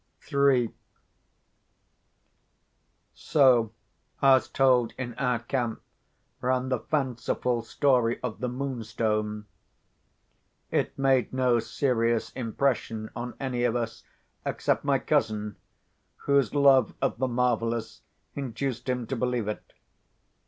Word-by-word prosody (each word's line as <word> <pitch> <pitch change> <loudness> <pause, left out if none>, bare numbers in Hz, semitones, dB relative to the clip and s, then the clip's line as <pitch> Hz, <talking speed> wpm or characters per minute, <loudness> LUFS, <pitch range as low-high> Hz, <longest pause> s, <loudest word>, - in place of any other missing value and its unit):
III 135 -4 +3 2.4
So, 125 -7 +3 0.5
as 135 -1 +4
told 125 -3 +3
in 120 -2 -4
our 125 -2 +1
camp, 120 0 -2 0.6
ran 130 +1 0
the 130 -2 0
fanciful 125 -3 -1
story 120 -1 +1
of 120 -3 -4
the 125 - -2
Moonstone. 110 -5 -2 1.3
It - - -1
made 135 -4 +2
no 125 -2 +2
serious 115 -2 0
impression 115 -3 -2
on 120 0 -5
any 125 -3 -2
of 120 -1 +1
us 115 -2 -3 0.4
except - - 0
my - - +3
cousin—whose 110 +5 -2
love 135 -5 +5
of - - -1
the 130 - +1
marvellous 120 -2 -1 0.3
induced 130 -1 -4
him 125 -2 -1
to 135 - -3
believe 125 -3 -1
it. 105 - -5
125 Hz, 105 wpm, -27 LUFS, 115-130 Hz, 2.4 s, love